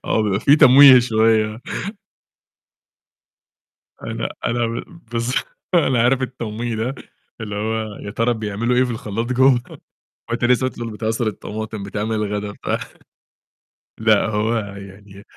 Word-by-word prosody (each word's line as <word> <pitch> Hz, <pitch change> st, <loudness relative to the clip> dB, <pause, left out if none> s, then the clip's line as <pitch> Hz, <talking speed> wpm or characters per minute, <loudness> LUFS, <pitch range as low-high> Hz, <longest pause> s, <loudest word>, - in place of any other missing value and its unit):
آه، 110 Hz, -, +1 dB
بيبقى 100 Hz, -1 st, 0 dB
في 140 Hz, +4 st, +5 dB
تمويه 135 Hz, -1 st, +9 dB
شوية. 110 Hz, -1 st, +1 dB, 2.4 s
أنا -, -, -4 dB, 0.2 s
أنا 120 Hz, 0 st, 0 dB
ب -, -, -13 dB, 0.3 s
بالض 115 Hz, +1 st, -1 dB, 0.4 s
أنا 130 Hz, -8 st, +3 dB
عارف 130 Hz, +2 st, +2 dB
التمويه 120 Hz, -2 st, -4 dB
ده 120 Hz, +5 st, -2 dB, 0.5 s
اللي 105 Hz, -2 st, -5 dB
هو 110 Hz, 0 st, -3 dB
يا 100 Hz, -, -8 dB
ترى 115 Hz, +2 st, 0 dB
بيعملوا 110 Hz, +3 st, -2 dB
إيه 130 Hz, -, +4 dB
في 125 Hz, -, -3 dB
الخلّاط 115 Hz, 0 st, -3 dB
جوّه. 130 Hz, -1 st, +4 dB, 0.7 s
وأنت 120 Hz, +1 st, -2 dB
لسّه 125 Hz, +1 st, +3 dB
أصلًا 120 Hz, -2 st, -6 dB
بتعصُر 110 Hz, +2 st, -2 dB
الطماطم، 110 Hz, 0 st, -5 dB
بتعمل 105 Hz, +2 st, -3 dB
الغدا 105 Hz, -1 st, -2 dB
بتاع. -, -, -3 dB, 1.2 s
لأ، 110 Hz, -2 st, +3 dB
هو 110 Hz, +2 st, 0 dB
يعني 100 Hz, -1 st, -9 dB
110 Hz, 130 wpm, -20 LUFS, 105-120 Hz, 2.4 s, تمويه